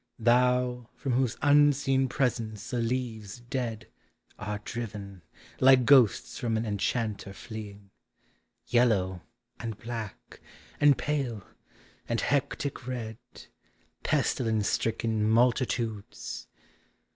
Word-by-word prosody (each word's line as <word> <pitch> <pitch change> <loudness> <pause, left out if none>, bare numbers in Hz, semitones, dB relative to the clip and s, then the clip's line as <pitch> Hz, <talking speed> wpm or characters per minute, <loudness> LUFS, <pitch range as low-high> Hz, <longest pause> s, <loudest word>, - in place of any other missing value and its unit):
Thou, 125 0 +2
from 135 - -3
whose 125 -1 +1
unseen 145 -2 +4
presence 115 -4 -2
the 125 - 0
leaves 115 -3 -3
dead 120 -2 -4 0.5
Are 105 0 -3
driven, 105 -4 -6 0.4
like 130 -1 +6
ghosts 130 -5 +4
from 115 -2 0
an 110 - -1
enchanter 105 -1 -2
fleeing, 100 -2 -9 0.7
Yellow, 100 -7 +2 0.4
and 115 -3 -5
black, 115 -2 -7 0.4
and 145 -3 +6
pale, 125 -7 -2 0.7
and 115 -1 +1
hectic 140 -2 -1
red, 115 -3 -4 0.8
Pestilence 110 -4 +1
stricken 110 -1 0
multitudes! 115 -2 0
115 Hz, 95 wpm, -28 LUFS, 110-125 Hz, 0.8 s, like